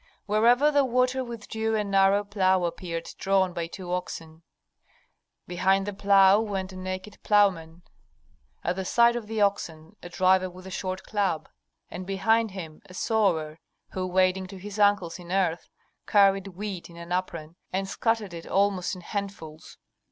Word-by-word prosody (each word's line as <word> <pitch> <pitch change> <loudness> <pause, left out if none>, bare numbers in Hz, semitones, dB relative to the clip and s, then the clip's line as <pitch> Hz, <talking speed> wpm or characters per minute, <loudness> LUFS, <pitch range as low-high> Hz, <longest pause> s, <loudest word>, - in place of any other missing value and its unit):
Wherever 240 +8 +4
the 285 -1 +4
water 255 +1 +1
withdrew 225 -2 -3
a 210 - +1
narrow 195 0 +3
plough 190 -3 +1
appeared 170 -1 -4
drawn 190 -2 +2
by 170 -1 -3
two 180 0 -6
oxen. 165 -3 -5 1.0
Behind 190 +2 +1
the 205 - -4
plough 195 0 +5
went 195 -3 -3
a - - -10
naked 185 +2 -6
ploughman, 180 -5 +2 0.8
at 175 +2 -1
the 190 - -2
side 235 +5 +4
of 235 -3 -5
the 220 -1 -2
oxen 165 -6 -1
a 175 - -9
driver 185 +1 +3
with 185 +1 -13
a 190 - -8
short 185 0 -4
club, 195 -7 -1 0.4
and 185 +1 -7
behind 220 +3 +2
him 170 -5 -9
a 185 - -13
sower, 170 -8 0 0.3
who, 185 -1 -3
wading 185 +1 +1
to 195 +1 -10
his 205 +2 -8
ankles 205 -4 +2
in 175 0 -10
earth, 180 -3 0 0.4
carried 195 -1 +4
wheat 195 -1 -6
in 170 - -14
an 170 +1 -10
apron, 170 -3 -3 0.2
and 195 +1 -2
scattered 220 -2 -1
it 165 -1 -8
almost 195 -1 +1
in 180 - -10
handfuls. 175 -5 -7
190 Hz, 160 wpm, -26 LUFS, 180-205 Hz, 1.0 s, plough